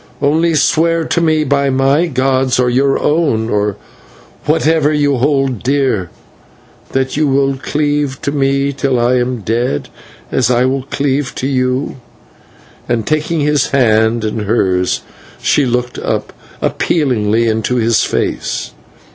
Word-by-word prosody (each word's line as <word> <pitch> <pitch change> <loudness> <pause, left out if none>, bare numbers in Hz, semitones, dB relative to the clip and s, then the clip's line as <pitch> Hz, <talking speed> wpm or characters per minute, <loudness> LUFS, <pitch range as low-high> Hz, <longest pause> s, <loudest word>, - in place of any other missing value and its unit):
Only 160 +3 +2
swear 165 +2 +2
to 170 - 0
me 155 -2 +2
by 140 -1 +1
my 135 +5 +2
gods, 130 -2 +1
or 125 -1 +2
your 135 +2 +2
own, 145 -8 0
or 105 -1 0 0.7
whatever 155 -1 +2
you 145 -2 +1
hold 135 -3 0
dear, 130 -9 0 0.8
that 130 0 -1
you 150 +1 +1
will 135 0 +2
cleave 145 0 -1
to 140 - -1
me 140 0 0
till 135 -2 0
I 120 +2 +2
am 125 -1 -1
dead, 115 - -1 0.4
as 125 -3 +1
I 125 0 +3
will 130 0 -1
cleave 140 -2 -1
to - - -3
you." 130 0 -1 0.9
And, 115 -2 0
taking 155 +1 0
his 145 -2 +2
hand 110 -3 +2
in 110 +1 -2
hers, 95 -4 +1 0.4
she 140 -3 +2
looked 125 0 -2
up - - -3 0.3
appealingly 115 -7 +1
into 110 +2 0
his 115 -1 +2
face. - - -2
135 Hz, 140 wpm, -15 LUFS, 120-145 Hz, 0.9 s, I